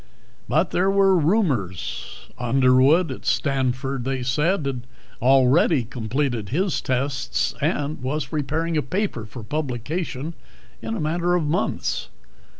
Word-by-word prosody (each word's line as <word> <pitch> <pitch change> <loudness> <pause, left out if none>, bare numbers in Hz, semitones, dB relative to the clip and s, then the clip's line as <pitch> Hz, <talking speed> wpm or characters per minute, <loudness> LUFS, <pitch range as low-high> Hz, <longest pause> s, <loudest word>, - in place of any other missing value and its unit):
But 155 +9 +2
there 185 +2 +2
were 195 -1 +4
rumors. 150 - -1
Underwood 130 +6 +4
at 130 - -7
Stanford, 135 -1 0
they 130 0 -2
said, 150 +6 +1
had 135 -3 -2 0.4
already 135 +3 +4
completed 120 -1 -2
his 180 +6 0
tests 130 +1 -1
and 145 0 -1
was 140 +4 -2
preparing 155 +2 -1
a - - +3
paper 145 - -2
for 110 +2 -9
publication 145 - -3 0.5
in 110 0 -3
a - - -3
matter 170 +3 +1
of 175 - +1
months. 165 +7 -1
140 Hz, 125 wpm, -23 LUFS, 125-165 Hz, 0.5 s, were